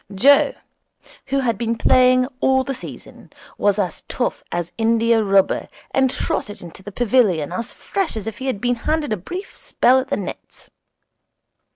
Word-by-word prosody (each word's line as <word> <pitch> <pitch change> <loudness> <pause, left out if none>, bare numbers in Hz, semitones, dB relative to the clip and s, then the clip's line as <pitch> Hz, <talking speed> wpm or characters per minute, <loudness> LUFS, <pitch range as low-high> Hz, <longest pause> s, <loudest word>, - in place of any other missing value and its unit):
Joe, 275 +8 +5 0.7
who 275 0 0
had 230 -5 -1
been 230 -1 0
playing 255 +1 +4
all 265 0 +3
the 270 - -3
season, - - -11 0.3
was 205 -1 +2
as 185 -5 -2
tough 245 - -2
as 175 0 -3
india 230 0 +2
rubber, 195 -1 +2 0.2
and 265 -1 +3
trotted 205 -5 -3
into 175 +1 -11
the 205 +2 -9
pavilion 205 - +2
as 215 +6 -4
fresh 390 - -3
as 210 - -5
if 225 -1 -6
he 265 - -4
had 255 -7 -1
been 245 +2 +1
having 305 +1 -1
a - - +1
brief 360 - -7
spell 255 +2 +3
at 260 - -4
the - - -1
nets. 200 - -8
230 Hz, 170 wpm, -21 LUFS, 205-260 Hz, 0.7 s, Joe